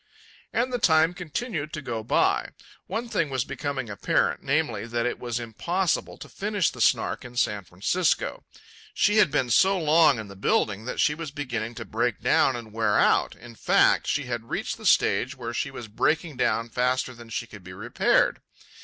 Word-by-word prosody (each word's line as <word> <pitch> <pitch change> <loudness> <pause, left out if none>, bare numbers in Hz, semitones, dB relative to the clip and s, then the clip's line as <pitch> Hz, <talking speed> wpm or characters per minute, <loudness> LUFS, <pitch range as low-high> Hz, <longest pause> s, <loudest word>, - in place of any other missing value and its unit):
And 250 +2 0
the 245 - 0
time 160 -3 +4
continued 175 - -4
to 155 - -3
go 115 -3 -3
by. - - +1 0.4
One 225 +6 -3
thing 170 -10 -1
was 130 -2 -1
becoming 140 -4 -4
apparent, 100 -1 0
namely, 115 - -1
that 120 0 -1
it 125 - -2
was 120 -1 -3
impossible 170 - -2
to - - -10
finish 205 -3 -1
the - - -8
Snark - - +2
in 125 0 -11
San 105 -4 0
Francisco. 110 - -1 0.5
She 210 +1 +3
had 210 - +5
been 130 -4 0
so 195 - +4
long 155 -4 +4
in 110 -1 -6
the 100 - -11
building 100 +2 0
that 125 - -5
she 150 - +3
was 160 0 -6
beginning 120 -6 -4
to - - -7
break - - -1
down 135 - +3
and 115 -3 -8
wear 115 0 +1
out. - - +3
In 120 0 -13
fact, - - +3
she 145 - 0
had 120 -2 -5
reached - - -3
the - - -2
stage 130 +7 +3
where 120 -1 -5
she - - -2
was 120 - -8
breaking 150 +8 0
down 115 -2 0
faster 125 +1 0
than 120 -1 -13
she 115 - -3
could 105 -4 -13
be 90 +1 -10
repaired. 95 - +1
130 Hz, 190 wpm, -25 LUFS, 115-160 Hz, 0.5 s, had